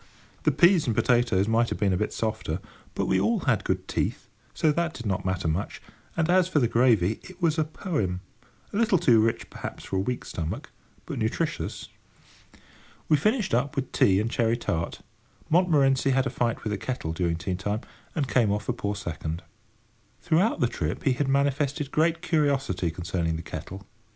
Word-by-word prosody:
The - - +5
peas 175 -4 +4
and 115 - +1
potatoes 120 -6 +3
might 115 +1 +2
have - - -3
been 100 -2 +2
a - - +2
bit 105 - -1
softer, 110 -7 -2 0.4
but - - 0
we 95 - +2
all 230 -4 +1
had 120 -7 +1
good 95 0 -2
teeth, - - -2 0.2
so 155 - +2
that 170 +1 -1
did 120 - -8
not 95 -3 -1
matter 95 -2 -1
much: 80 +5 -2 0.4
and 160 -1 +2
as 180 0 +4
for 185 - -1
the 125 -5 +4
gravy, 110 -5 +3
it 185 -1 -13
was 165 -3 +2
a - - +4
poem—a 120 - -5
little 215 -3 +3
too 120 -8 +5
rich, 115 +1 -1
perhaps, - - -7
for 95 - -3
a - - +2
weak 125 +6 -2
stomach, 80 -2 -5 0.3
but - - -5
nutritious. - - -2 1.2
We 155 - +6
finished 215 - +1
up 140 +6 +1
with 135 -2 -2
tea 95 -1 +4
and 110 +2 -1
cherry 115 0 +1
tart. 85 -8 -3 0.5
Montmorency 145 -6 +4
had 135 0 +2
a - - -1
fight 120 -1 -1
with 105 - -2
the 105 - -2
kettle 95 -9 -3
during 85 0 0
tea 90 +3 -3
time, 105 +4 -2 0.3
and 145 -5 0
came 120 -5 +3
off 105 +1 -2
a 125 - +1
poor 105 -4 -3
second. 85 -3 -5 0.8
Throughout 175 +7 +2
the 125 - +4
trip, 85 -8 -3
he 135 - +3
had 140 +2 -1
manifested 140 +1 +1
great 165 +2 +1
curiosity 140 - +1
concerning 85 -1 -2
the 80 - -5
kettle. 95 +4 -7
120 Hz, 190 wpm, -26 LUFS, 95-150 Hz, 1.2 s, We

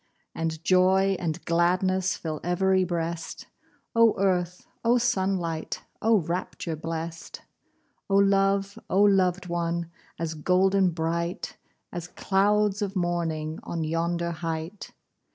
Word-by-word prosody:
And 160 0 -3
joy 190 +1 +4
and 160 -3 -3
gladness 185 +2 +2
Fill 155 -2 -5
ev'ry 185 +2 +2
breast! 170 -1 -3 0.5
Oh 230 -1 +5
earth! 180 -2 0 0.2
oh 235 +2 +4
sunlight! 190 -8 -1 0.2
Oh 220 -2 +4
rapture 170 0 -3
blest! 165 +1 -6 0.7
Oh 195 - +2
love! 195 0 +2
oh 195 +2 +4
loved 190 -2 +3
one! 170 -1 -2 0.3
As 165 -1 -3
golden 185 +4 +3
bright, 170 +1 -2 0.4
As 175 0 -5
clouds 205 +2 +1
of 200 -1 -2
morning 165 -3 -1
On 165 -1 -4
yonder 170 +2 -1
height! 165 +3 -5
180 Hz, 115 wpm, -26 LUFS, 165-195 Hz, 0.7 s, Oh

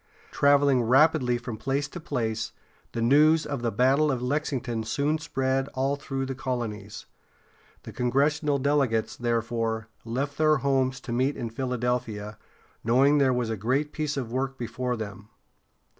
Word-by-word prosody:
Traveling 140 -2 +4
rapidly 130 +1 +4
from 120 -2 -6
place 135 +5 -1
to 175 - -7
place, 115 -8 -3 0.4
the 115 - -1
news 150 +6 +5
of 140 -4 -4
the 120 -1 0
battle 135 +7 +3
of 130 - -1
Lexington 125 -3 -2
soon 145 +8 0
spread 135 -3 -1
all 135 +2 +1
through 135 -1 -4
the 135 - -3
colonies. 115 -6 -4 0.8
The - - -8
congressional 145 +4 +1
delegates, 135 -5 +1
therefore, 115 -1 -1
left 135 +6 -3
their 155 -1 +4
homes 135 -1 0
to 125 - -7
meet 130 +4 +1
in 115 -2 -4
Philadelphia, 120 -4 -2 0.4
knowing 135 +6 +4
there 135 -2 +4
was 125 -2 -1
a - - -1
great 130 +8 -1
piece 150 -2 -2
of 120 -4 -3
work 135 +1 -2
before 125 0 -3
them. 105 -1 -7
130 Hz, 150 wpm, -26 LUFS, 115-140 Hz, 0.8 s, news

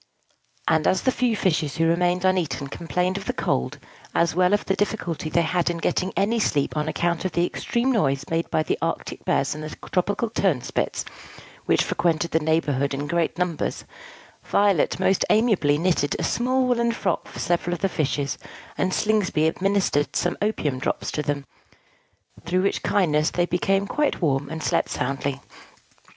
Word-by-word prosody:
And 160 -1 +3
as 185 - +2
the 260 - +3
few 245 -3 +1
fishes 155 -7 0
who 165 - +2
remained 175 +2 +2
uneaten 175 -7 +1
complained 180 +5 -1
of 195 - -6
the - - -1
cold, 65 - -1 0.4
as 170 - +2
well 180 +2 +3
as 205 - +3
of - - -15
the 195 - +1
difficulty 190 -6 -2
they 170 +2 +2
had 175 +1 +1
in 170 - -2
getting 185 +3 0
any 220 +4 +2
sleep 145 -10 0
on 150 0 -1
account 170 -1 0
of 185 -3 -2
the 175 - +2
extreme 240 +7 -1
noise 140 - +1
made 165 0 0
by 155 - +1
the - - -1
arctic - - -3
bears - - +1
and 155 +1 -7
the 155 - -5 0.2
tropical 205 +5 0
turnspits, 175 - 0 0.6
which - - +3
frequented 170 -1 0
the 160 - +3
neighborhood 145 -3 +1
in 145 +1 -3
great 170 +2 0
numbers, 180 -4 -2 0.6
Violet 200 -5 +2
most 190 - +3
amiably 210 -10 +3
knitted 165 -3 +1
a - - -3
small 255 +2 +1
woollen 235 -1 +2
frock 230 - -2
for - - -11
several 175 0 0
of - - -10
the 195 - +3
fishes, 145 -5 -1 0.4
and 185 0 +1
Slingsby 210 -7 +1
administered 185 -3 +1
some 175 - +1
opium 155 -11 0
drops - - -2
to 150 - -1
them; 145 -2 -2 1.0
through 185 +2 0
which 195 - 0
kindness 155 -5 +2
they 175 - +1
became 195 +3 +1
quite 295 +8 0
warm, 140 -4 0
and 160 0 -5
slept - - +1
soundly. 135 +1 -2
175 Hz, 175 wpm, -24 LUFS, 155-195 Hz, 1.0 s, And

